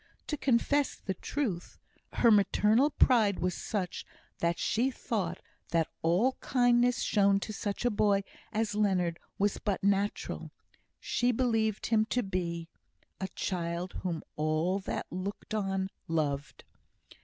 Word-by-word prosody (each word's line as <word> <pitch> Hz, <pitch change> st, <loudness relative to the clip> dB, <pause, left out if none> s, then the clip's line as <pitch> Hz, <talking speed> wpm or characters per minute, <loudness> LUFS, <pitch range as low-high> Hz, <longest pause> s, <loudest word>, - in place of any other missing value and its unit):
To 300 Hz, -, -2 dB
confess 280 Hz, +1 st, +2 dB
the 190 Hz, -, -4 dB
truth, 195 Hz, -3 st, -3 dB, 0.4 s
her 235 Hz, -, +5 dB
maternal 210 Hz, +6 st, +4 dB
pride 225 Hz, -8 st, +4 dB
was 180 Hz, +1 st, 0 dB
such 185 Hz, -2 st, -3 dB, 0.4 s
that 170 Hz, 0 st, +1 dB
she 240 Hz, +5 st, +1 dB
thought 205 Hz, -9 st, -3 dB, 0.3 s
that 165 Hz, -1 st, +1 dB
all 185 Hz, +11 st, +2 dB
kindness 245 Hz, -1 st, +3 dB
shown 200 Hz, -2 st, +3 dB
to 215 Hz, -, -4 dB
such 205 Hz, +3 st, -3 dB
a 245 Hz, -, +3 dB
boy 205 Hz, -1 st, +2 dB, 0.3 s
as 220 Hz, -1 st, 0 dB
Leonard 185 Hz, -5 st, +1 dB, 0.2 s
was 205 Hz, 0 st, +1 dB
but 200 Hz, -2 st, -2 dB
natural; 200 Hz, +1 st, 0 dB, 0.5 s
she 245 Hz, +1 st, +1 dB
believed 225 Hz, -3 st, +1 dB
him 220 Hz, -1 st, +3 dB
to 245 Hz, +2 st, 0 dB
be 170 Hz, -3 st, -3 dB, 0.5 s
A 190 Hz, -, -2 dB
child 175 Hz, 0 st, -2 dB
whom 170 Hz, -4 st, -3 dB
all 155 Hz, +5 st, +1 dB
that 195 Hz, -, -4 dB
looked 190 Hz, +4 st, -5 dB
on, 195 Hz, -2 st, -1 dB, 0.2 s
loved. 145 Hz, -3 st, -2 dB
200 Hz, 130 wpm, -30 LUFS, 180-225 Hz, 0.5 s, her